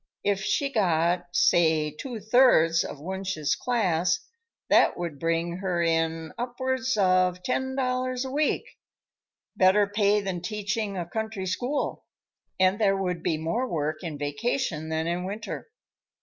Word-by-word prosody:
If 200 Hz, -1 st, +1 dB
she 275 Hz, +7 st, 0 dB
got, 175 Hz, -3 st, +1 dB
say 160 Hz, -3 st, +3 dB
two 230 Hz, -, -7 dB
thirds 205 Hz, -7 st, +4 dB
of 145 Hz, -, -7 dB
Wunsch's 190 Hz, -2 st, -2 dB
class, 185 Hz, -7 st, +1 dB, 0.5 s
that -, -, +4 dB
would 170 Hz, -5 st, -5 dB
bring 165 Hz, +1 st, -1 dB
her 180 Hz, -3 st, -1 dB
in 165 Hz, -1 st, 0 dB
upwards 260 Hz, 0 st, -1 dB
of 185 Hz, -2 st, +2 dB
ten 265 Hz, +3 st, -1 dB
dollars 255 Hz, -1 st, -1 dB
a 260 Hz, -, -5 dB
week. 300 Hz, +2 st, +1 dB, 0.9 s
Better 190 Hz, +2 st, +5 dB
pay 205 Hz, 0 st, +2 dB
than 190 Hz, -3 st, -3 dB
teaching 210 Hz, +1 st, -3 dB
a 175 Hz, -, -2 dB
country 220 Hz, +1 st, -4 dB
school, 245 Hz, +10 st, -2 dB, 0.5 s
and 190 Hz, +2 st, +3 dB
there 195 Hz, -2 st, +3 dB
would 180 Hz, -3 st, -2 dB
be 160 Hz, -, 0 dB
more 195 Hz, +12 st, -1 dB
work 155 Hz, -2 st, -1 dB
in 165 Hz, -5 st, -5 dB
vacation 160 Hz, -, -2 dB
than 160 Hz, 0 st, -1 dB
in 175 Hz, +1 st, -1 dB
winter. 210 Hz, -, -6 dB
185 Hz, 140 wpm, -26 LUFS, 165-220 Hz, 0.9 s, Better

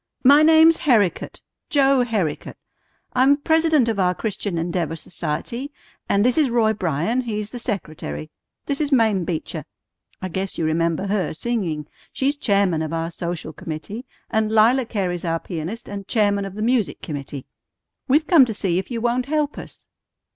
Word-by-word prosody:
"My 285 Hz, +3 st, +7 dB
name's 320 Hz, +1 st, +6 dB
Herricote, 220 Hz, -, +1 dB, 0.3 s
Joe 275 Hz, -3 st, +4 dB
Herricote. 205 Hz, -11 st, -2 dB, 0.6 s
I'm 270 Hz, +3 st, +4 dB
president 320 Hz, -3 st, +3 dB
of 220 Hz, -3 st, -1 dB
our 180 Hz, -1 st, +2 dB
Christian 205 Hz, -4 st, -3 dB
Endeavor 165 Hz, -1 st, -2 dB
Society, 180 Hz, -, -5 dB, 0.4 s
and 200 Hz, +2 st, +3 dB
this 250 Hz, +5 st, +3 dB
is 290 Hz, -4 st, +3 dB
Roy 225 Hz, -2 st, +2 dB
Bryan; 180 Hz, -, 0 dB
he's 215 Hz, -3 st, -4 dB
the 245 Hz, -, -6 dB
secretary. 155 Hz, -, -5 dB, 0.3 s
This 280 Hz, +1 st, -2 dB
is 295 Hz, -1 st, -1 dB
Mame 220 Hz, -8 st, +3 dB
Beecher. 165 Hz, -2 st, -4 dB, 0.6 s
I 185 Hz, -, -4 dB
guess 190 Hz, +2 st, -3 dB
you 165 Hz, -, 0 dB
remember 165 Hz, +3 st, 0 dB
her 195 Hz, -5 st, -1 dB
singing. 175 Hz, -9 st, -2 dB, 0.3 s
She's 275 Hz, +2 st, 0 dB
chairman 200 Hz, -, +1 dB
of 160 Hz, 0 st, -3 dB
our 165 Hz, +1 st, -2 dB
social 170 Hz, -2 st, -5 dB
committee, 165 Hz, +11 st, -6 dB, 0.3 s
and 220 Hz, -1 st, +1 dB
Lila 230 Hz, +3 st, +4 dB
Cary's 185 Hz, -6 st, -2 dB
our 165 Hz, -1 st, -1 dB
pianist 175 Hz, +9 st, -6 dB
and 200 Hz, -1 st, -7 dB
chairman 205 Hz, -3 st, +1 dB
of 195 Hz, -1 st, -8 dB
the 215 Hz, -, -3 dB
music 230 Hz, -, 0 dB
committee. 140 Hz, -2 st, -6 dB, 0.6 s
We've 295 Hz, +4 st, +3 dB
come 325 Hz, -5 st, +7 dB
to 225 Hz, -3 st, -5 dB
see 185 Hz, -3 st, 0 dB
if 190 Hz, -, -6 dB
you 235 Hz, -2 st, -3 dB
won't 245 Hz, +2 st, 0 dB
help 300 Hz, 0 st, -1 dB
us." -, -, -11 dB
210 Hz, 165 wpm, -22 LUFS, 170-250 Hz, 0.6 s, My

